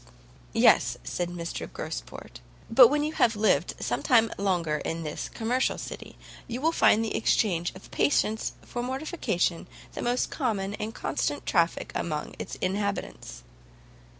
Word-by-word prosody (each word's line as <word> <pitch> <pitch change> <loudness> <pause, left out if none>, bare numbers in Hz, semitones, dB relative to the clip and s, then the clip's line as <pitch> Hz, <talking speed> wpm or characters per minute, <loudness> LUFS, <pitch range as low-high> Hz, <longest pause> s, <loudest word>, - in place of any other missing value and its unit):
"Yes," - - +4
said 175 -1 -3
Mr 170 -1 -5
Gosport; - - -7 0.3
"but 245 +1 +9
when 295 +4 +1
you 305 +1 -2
have 235 -6 +3
lived 210 +1 +2
some - - -1
time 230 -4 +4
longer 175 -6 0
in 165 0 -3
this 150 -1 -4
commercial 245 +3 0
city, - - -8 0.3
you 240 +1 -4
will 320 +4 +2
find 225 -8 +4
the 220 - -3
exchange 175 -6 +1
of 185 - -13
patience 220 -6 +1
for 240 - -5
mortification 255 - -1 0.3
the - - -5
most 245 +1 0
common 205 -8 -1
and 215 +1 -4
constant 145 0 -2
traffic 170 -1 +1
amongst 150 -3 -3
its - - -6
inhabitants." 190 - -3
210 Hz, 145 wpm, -27 LUFS, 170-245 Hz, 0.3 s, but